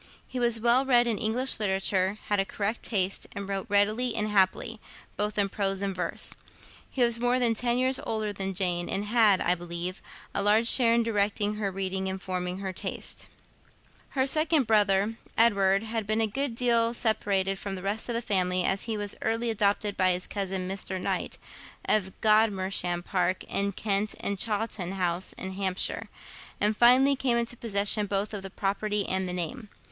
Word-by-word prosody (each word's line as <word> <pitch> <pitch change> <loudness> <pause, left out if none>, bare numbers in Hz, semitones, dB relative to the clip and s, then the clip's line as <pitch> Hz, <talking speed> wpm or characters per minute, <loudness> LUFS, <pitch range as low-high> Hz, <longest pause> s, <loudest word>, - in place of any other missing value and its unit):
He 255 - -5
was 235 -2 +2
well 240 +3 +3
read 245 -3 +4
in 230 -3 -1
English 245 +3 0
literature, 190 -1 +1
had 205 -1 0
a - - +3
correct 205 +3 -3
taste, 195 -3 -1
and 200 -1 -6
wrote 195 -1 -4
readily 215 +4 +2
and 215 -1 +1
happily, 210 +3 +1 0.4
both 210 +1 -2
in 200 -1 +2
prose 195 0 -2
and 195 -1 -2
verse. 180 - 0 0.6
He 255 - 0
was 235 -1 +2
more 245 +1 +1
than 240 -2 +2
ten 240 +2 0
years 260 +1 0
older 215 -2 -2
than 195 -1 -4
Jane, 175 -2 0
and 200 +2 -1
had, 210 -3 +3
I 175 - +2
believe, 175 +1 -4 0.3
a - - 0
large 215 +3 +3
share 235 -2 +7
in 235 - +2
directing 210 -1 0
her 205 -2 -1
reading 190 0 -3
and 190 0 -4
forming 180 -1 -3
her 190 -1 -5
taste. - - -5 0.9
Her 260 - +3
second 310 0 +3
brother, 210 0 +2 0.2
Edward, 200 -3 +3
had 220 -2 -3
been 215 +1 0
a 225 - +3
good 255 +3 -2
deal 235 -1 +1
separated 195 -4 0
from 195 -1 -5
the 185 - -8
rest 205 +4 -3
of 235 - -2
the 235 - -2
family, 185 -3 +2
as 195 +2 0
he 225 -2 -3
was 205 0 -2
early 225 +1 0
adopted 205 -1 0
by 185 -1 +3
his 180 +1 -1
cousin, 190 -2 -3
Mr. 190 0 0
Knight, - - -3 0.5
of 190 -3 +1
Godmersham 195 -5 +1
Park 185 0 -1
in 200 0 -1
Kent 205 +1 -1
and 200 -1 -2
Chawton 210 -4 -2
House 180 -1 -2
in 190 - -6
Hampshire; 190 -1 -1 0.5
and 210 +1 +2
finally 255 +5 +5
came 255 -3 0
into 235 +1 -1
possession 210 -2 +1
both 200 +2 -2
of 205 - -5
the 195 - -8
property 205 +1 -2
and 190 -1 -1
the - - -2
name. 205 +6 -4
205 Hz, 185 wpm, -27 LUFS, 190-230 Hz, 0.9 s, share